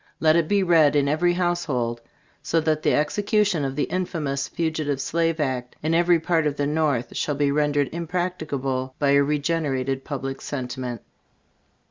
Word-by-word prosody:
Let 155 Hz, 0 st, +4 dB
it 170 Hz, -2 st, +2 dB
be 200 Hz, +1 st, +2 dB
read 160 Hz, -5 st, +4 dB
in 140 Hz, -1 st, +3 dB
every 165 Hz, +4 st, +2 dB
household, 150 Hz, -10 st, -1 dB, 0.4 s
so 165 Hz, -, +1 dB
that 155 Hz, -1 st, 0 dB
the -, -, +2 dB
execution 200 Hz, +2 st, +1 dB
of 135 Hz, -1 st, -2 dB
the 145 Hz, -, 0 dB
infamous 155 Hz, -7 st, -2 dB
Fugitive 155 Hz, -4 st, -2 dB
Slave 165 Hz, +3 st, 0 dB
Act, 130 Hz, -4 st, -2 dB
in 160 Hz, +1 st, +1 dB
every 170 Hz, 0 st, +4 dB
part 160 Hz, -1 st, +1 dB
of 145 Hz, -, -1 dB
the 145 Hz, -, 0 dB
North, 145 Hz, -5 st, 0 dB
shall 145 Hz, -, -1 dB
be 140 Hz, 0 st, +1 dB
rendered 145 Hz, -1 st, +1 dB
impracticable 155 Hz, -7 st, -3 dB
by 140 Hz, -1 st, +2 dB
a 140 Hz, 0 st, +5 dB
regenerated 140 Hz, -3 st, -1 dB
public 135 Hz, -2 st, -5 dB
sentiment. 125 Hz, -3 st, -5 dB
150 Hz, 160 wpm, -24 LUFS, 135-165 Hz, 0.4 s, a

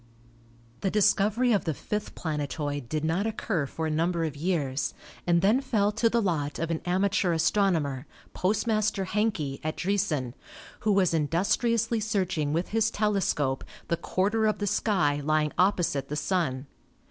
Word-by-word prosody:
The 195 Hz, -, 0 dB
discovery 210 Hz, +4 st, +3 dB
of 205 Hz, -, +1 dB
the 160 Hz, -3 st, -1 dB
fifth 210 Hz, +8 st, -4 dB
planetoid 145 Hz, -4 st, -3 dB
did 155 Hz, 0 st, -1 dB
not 175 Hz, +7 st, 0 dB
occur 200 Hz, -8 st, -1 dB
for 160 Hz, +4 st, -4 dB
a 160 Hz, -, -1 dB
number 165 Hz, +2 st, 0 dB
of 155 Hz, -2 st, -4 dB
years 145 Hz, -5 st, -1 dB, 0.3 s
and 170 Hz, 0 st, +3 dB
then 220 Hz, +7 st, +4 dB
fell 215 Hz, -6 st, +1 dB
to 225 Hz, +2 st, +2 dB
the 230 Hz, 0 st, +1 dB
lot 150 Hz, -6 st, -1 dB
of 165 Hz, 0 st, -2 dB
an 160 Hz, -, -2 dB
amateur 185 Hz, 0 st, +1 dB
astronomer, 160 Hz, -6 st, +1 dB, 0.3 s
Postmaster 215 Hz, 0 st, 0 dB
Hencke, 185 Hz, -9 st, -1 dB
at 155 Hz, 0 st, -3 dB
Driessen, 175 Hz, -, -1 dB, 0.5 s
who 215 Hz, -, +1 dB
was 190 Hz, -4 st, +3 dB
in 155 Hz, -3 st, +1 dB
dustriously 225 Hz, +6 st, +1 dB
searching 185 Hz, -8 st, 0 dB
with 165 Hz, +4 st, -1 dB
his 220 Hz, 0 st, +2 dB
telescope 190 Hz, -11 st, 0 dB, 0.3 s
the 170 Hz, -, +2 dB
quarter 210 Hz, +6 st, +1 dB
of 215 Hz, -, +1 dB
the 205 Hz, -, -2 dB
sky 180 Hz, -8 st, +1 dB
lying 155 Hz, 0 st, +1 dB
opposite 175 Hz, -7 st, +2 dB
the 150 Hz, -, -4 dB
Sun. 150 Hz, -6 st, -1 dB
180 Hz, 160 wpm, -27 LUFS, 155-210 Hz, 0.5 s, then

